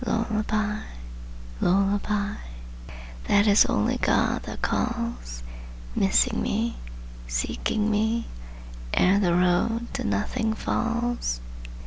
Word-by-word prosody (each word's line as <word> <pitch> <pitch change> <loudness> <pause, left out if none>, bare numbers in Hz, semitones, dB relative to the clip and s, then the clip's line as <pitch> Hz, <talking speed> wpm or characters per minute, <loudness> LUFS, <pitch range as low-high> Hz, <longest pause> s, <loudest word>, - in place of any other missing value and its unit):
Lullabye 215 -2 -1 0.8
lullabye 200 +2 +1 0.9
That 205 +1 +4
is 205 -1 +6
only - - +1
God - - +1
that - - -7
calls, 230 - -2 0.5
Missing 195 - +3
me, 230 +3 -1 0.5
seeking 210 - -1
me, 220 +2 +1 0.7
Ere 195 +2 +4
the 175 -4 +2
road 180 +7 +1
to - - -3
nothing 220 - -1
falls! 235 - -1
210 Hz, 90 wpm, -25 LUFS, 195-230 Hz, 0.9 s, is